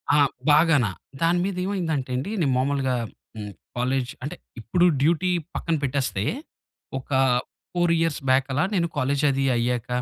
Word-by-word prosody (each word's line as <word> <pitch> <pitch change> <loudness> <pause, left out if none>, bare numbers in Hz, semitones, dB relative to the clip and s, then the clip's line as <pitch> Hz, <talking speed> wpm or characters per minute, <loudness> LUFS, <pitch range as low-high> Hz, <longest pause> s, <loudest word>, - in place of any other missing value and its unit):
ఆ! - - +5 0.3
బాగాన 150 -4 +5 0.4
దాని 170 +1 +3
మీదేమైందంటే 180 -8 -2
అండి. 140 +12 -2
నేను 140 -4 +2
మామూలుగా 135 -1 +1 0.4
హ్మ్, 105 -1 -6 0.3
కాలేజ్ 125 0 0
అంటే 155 +5 -4 0.3
ఇప్పుడు 175 +11 +2 0.2
డ్యూటీ 170 +4 +2 0.2
పక్కన 165 -1 0
పెట్టేస్తే. 130 -7 -1 0.8
ఒక 130 - -16 0.6
4 175 -1 +2
ఇయర్స్ 165 -4 0
బ్యాక్ 135 +1 +4
అలా 155 - +2
నేను 170 -2 +2
కాలేజ్ 140 +3 0
అది 135 0 0
అయ్యాక 120 0 -1
140 Hz, 140 wpm, -24 LUFS, 130-170 Hz, 0.8 s, ఆ